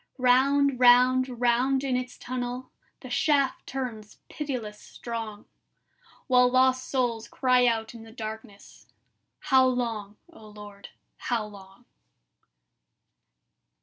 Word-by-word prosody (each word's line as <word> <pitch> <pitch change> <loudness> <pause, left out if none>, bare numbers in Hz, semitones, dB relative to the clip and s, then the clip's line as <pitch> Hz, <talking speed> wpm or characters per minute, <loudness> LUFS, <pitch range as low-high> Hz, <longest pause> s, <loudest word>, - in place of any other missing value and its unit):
Round, 265 +1 +3
round, 250 0 +4
round 250 +3 +2
in 265 -2 -1
its 250 0 -4
tunnel 250 0 -5 0.3
The 255 - -10
shaft 280 0 +1
turns 235 -6 -6
pitiless 245 -8 -5
strong, 225 -3 -7 0.8
While 250 -2 +4
lost 255 0 +2
souls 235 -4 -1
cry 250 -1 +2
out 225 -1 -1
in 230 - -11
the 225 0 -13
darkness: 220 -2 -10 0.5
"How 265 -3 +4
long, 225 -5 -3 0.2
O 220 -9 -15
Lord, 205 -1 -12 0.3
how 235 -3 -2
long?" 200 +2 -15
245 Hz, 110 wpm, -26 LUFS, 220-255 Hz, 0.8 s, round